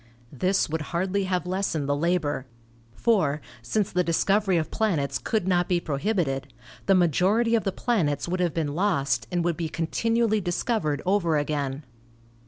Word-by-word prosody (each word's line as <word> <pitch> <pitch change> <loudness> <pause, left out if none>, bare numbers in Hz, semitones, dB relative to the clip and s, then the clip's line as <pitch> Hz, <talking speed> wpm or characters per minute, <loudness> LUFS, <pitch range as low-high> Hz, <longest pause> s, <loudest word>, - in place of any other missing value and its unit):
This 185 +8 +1
would 160 +1 -2
hardly 185 +5 -1
have 180 -1 -1
lessened 180 -5 -1
the 145 - +1
labor. 150 -4 0 0.5
For, 180 -11 +2 0.2
since 200 - -1
the 180 0 +2
discovery 195 +3 +2
of 160 - -2
planets 155 -11 0
could 215 -5 -1
not 175 -1 +2
be 180 -1 +2
prohibited, 140 -4 -1 0.4
the 195 - +5
majority 185 - +3
of 225 -2 +2
the 195 - +1
planets 170 - 0
would 180 +1 -2
have 175 -2 +1
been 155 -4 -1
lost 140 - 0
and 175 -1 0
would 170 -2 0
be 165 -2 -2
continually 220 +7 0
discovered 175 - -1
over 180 -5 +2
again. 145 -1 -2
175 Hz, 160 wpm, -26 LUFS, 150-195 Hz, 0.5 s, the